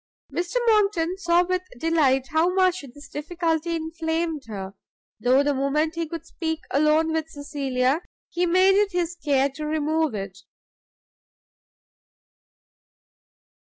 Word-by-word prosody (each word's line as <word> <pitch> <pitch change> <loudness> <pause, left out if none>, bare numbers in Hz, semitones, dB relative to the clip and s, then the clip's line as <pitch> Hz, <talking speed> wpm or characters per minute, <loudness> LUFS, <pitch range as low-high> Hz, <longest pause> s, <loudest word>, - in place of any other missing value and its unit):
Mr 350 +5 -3
Monckton 395 -6 +2
saw 345 -1 +3
with 365 0 0 0.2
delight 270 -3 +2
how 320 +3 +2
much 370 -2 +2
this 290 -1 -12
difficulty 330 +1 -2
inflamed 325 -1 -2
her, 195 -3 -6 0.5
though 255 +5 +4
the 290 0 +1
moment 285 +4 0
he 335 -1 -3
could 330 +1 -7
speak 320 -1 -4
alone 305 +3 +3
with 320 0 -2
Cecilia 285 -1 -1 0.3
he 355 0 -1
made 370 +3 +5
it 400 -1 +2
his 350 -1 0
care 275 -2 +2
to 305 +3 -7
remove 310 -2 0
it. 195 -2 -6
320 Hz, 120 wpm, -24 LUFS, 285-345 Hz, 0.5 s, made